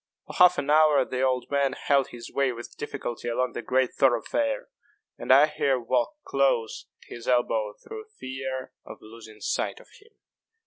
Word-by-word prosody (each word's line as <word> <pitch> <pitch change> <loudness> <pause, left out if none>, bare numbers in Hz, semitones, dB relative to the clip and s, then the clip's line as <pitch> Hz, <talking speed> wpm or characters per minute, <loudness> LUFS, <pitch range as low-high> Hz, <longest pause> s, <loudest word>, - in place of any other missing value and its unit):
For - - -10
half 180 0 +6
an 145 - -1
hour 150 -3 +5
the 130 0 -3
old 130 0 0
man 140 -2 +1
held 140 -1 +1
his 115 -1 -10
way 140 -2 +1
with 120 0 -9
difficulty 120 -4 -6
along 125 +1 -1
the - - -4
great 130 +1 0
thoroughfare; 135 - +1 0.5
and - - -1
I 140 +3 +8
here 140 -3 0
walked 125 - -1
close 135 -5 0 0.2
at - - -12
his 120 - -10
elbow 110 -4 +1
through 440 -1 -9
fear 130 0 -5
of - - -11
losing 110 0 -13
sight - - -2
of - - -18
him. 430 - -21
130 Hz, 175 wpm, -26 LUFS, 120-140 Hz, 0.5 s, I